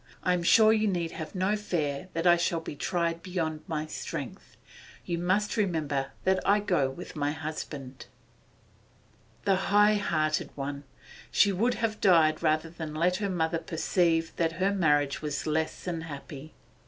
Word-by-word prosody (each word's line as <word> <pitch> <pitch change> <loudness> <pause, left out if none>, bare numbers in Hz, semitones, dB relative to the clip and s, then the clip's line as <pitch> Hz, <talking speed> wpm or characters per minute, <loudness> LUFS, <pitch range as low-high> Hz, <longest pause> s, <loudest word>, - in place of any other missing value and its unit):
'I 180 - +3
am 180 - 0
sure 220 +5 +6
you 215 -1 +2
need 175 -4 -1
have 160 +5 -7
no 190 +3 +1
fear 175 -5 -2
that 165 +1 -2
I 175 -1 +7
shall 170 -1 0
be 160 - -7
tried 170 +2 -1
beyond 165 -5 -3
my 155 -3 -2
strength. 155 - -7 0.5
You 170 -1 -2
must 190 +6 0
remember 155 -9 0
that 190 0 +2
I 205 +1 +4
go 175 -10 +1
with 135 +7 -9
my 145 -1 0
husband.' 150 -4 -7 1.4
The 195 - +4
high 210 +1 +5
hearted 155 -6 0
one! 140 0 -5 0.4
She 200 - +4
would 230 +6 +1
have 220 -1 -2
died 160 -5 +4
rather 155 +1 +1
than 160 -2 -6
let 180 +3 +2
her 200 -1 -2
mother 165 -2 0
perceive 165 0 0
that 165 -1 +1
her 190 +4 +1
marriage 150 -7 +2
was 150 -2 -3
less 160 0 -1
than 170 -3 -3
happy. 145 -1 -9
165 Hz, 165 wpm, -28 LUFS, 155-185 Hz, 1.4 s, I